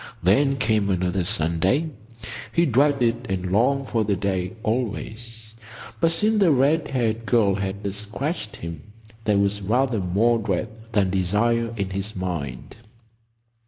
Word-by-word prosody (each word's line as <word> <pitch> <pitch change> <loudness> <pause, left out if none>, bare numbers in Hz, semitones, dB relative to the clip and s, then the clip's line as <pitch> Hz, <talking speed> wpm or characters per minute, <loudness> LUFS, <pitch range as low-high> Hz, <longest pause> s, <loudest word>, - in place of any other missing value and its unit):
Then 135 +10 +3
came 110 -4 +1
another 90 0 0
Sunday. 95 - +1 0.6
He 170 - +3
dreaded 125 -3 +2
and 95 -1 -2
longed 130 +6 +2
for 115 -2 +1
the 105 -1 +1
day 95 -1 -2
always, 115 -1 -3 0.5
but 165 -1 +3
since 215 +6 +2
the 190 -4 +5
red 145 +3 +3
haired 115 -3 -1
girl 110 -5 +3
had 100 0 -3
sketched 105 - -3
him 85 -2 -7 0.4
there 105 -2 +3
was 100 +1 +1
rather 120 +3 +1
more 105 +6 +2
dread 105 0 -1 0.2
than 100 -3 +2
desire 110 +5 +1
in 100 -1 -2
his 100 +3 -3
mind. 75 - -5
110 Hz, 135 wpm, -24 LUFS, 95-125 Hz, 0.6 s, the